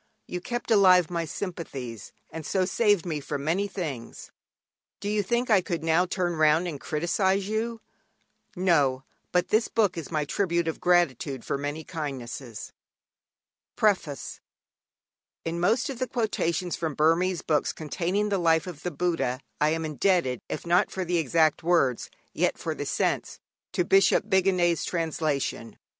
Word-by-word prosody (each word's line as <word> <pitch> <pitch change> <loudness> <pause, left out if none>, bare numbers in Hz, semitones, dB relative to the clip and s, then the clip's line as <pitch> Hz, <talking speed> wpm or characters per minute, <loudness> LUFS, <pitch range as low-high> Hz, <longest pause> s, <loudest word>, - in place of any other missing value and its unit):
You 180 - -5
kept 240 +3 -4
alive 185 -5 +6
my 170 -1 -1
sympathies, 140 - -6 0.2
and 160 - -6
so 185 +4 +1
saved 205 -2 +2
me 160 -4 -2
from 140 0 -4
many 180 +7 0
things. 150 -12 -6 0.7
Do 205 - -5
you 210 0 +1
think 235 +5 0
I 200 -3 +6
could 170 -2 -3
now 165 +3 +3
turn 175 -1 -1
round 155 +3 +4
and 150 -5 -5
criticise 190 +5 0
you? 225 +2 -2 0.7
No; 145 -8 +2 0.3
but 180 0 +1
this 220 +2 +3
book 200 -6 +1
is 160 - -8
my 155 -3 -1
tribute 170 +1 0
of 160 - -2
gratitude 150 -7 +1
for - - -1
many 145 +3 -4
kindnesses._ 135 - -6 1.0
PREFACE 185 -9 0 1.1
In 165 +1 -2
most 220 +7 +2
of 265 -3 -5
the 255 - -1
quotations 185 -7 -1
from 160 -4 -3
Burmese 165 +4 +2
books 150 -2 +1
containing 180 +6 -2
the 200 -2 +1
life 160 -2 +3
of 170 -5 -8
the 180 - -2
Buddha 140 -6 -1 0.2
I 150 - +3
am 160 +1 -1
indebted, 155 - +1
if - - -4
not 175 +2 +3
for 190 -1 -3
the 175 0 0
exact 160 +1 +2
words, 160 -8 +2 0.2
yet - - +1
for - - -3
the - - -5
sense, - - -1 0.3
to 180 - +1
Bishop 195 +2 +4
Bigandet's 180 -3 +2
translation. 155 -8 -2
170 Hz, 155 wpm, -27 LUFS, 150-190 Hz, 1.1 s, alive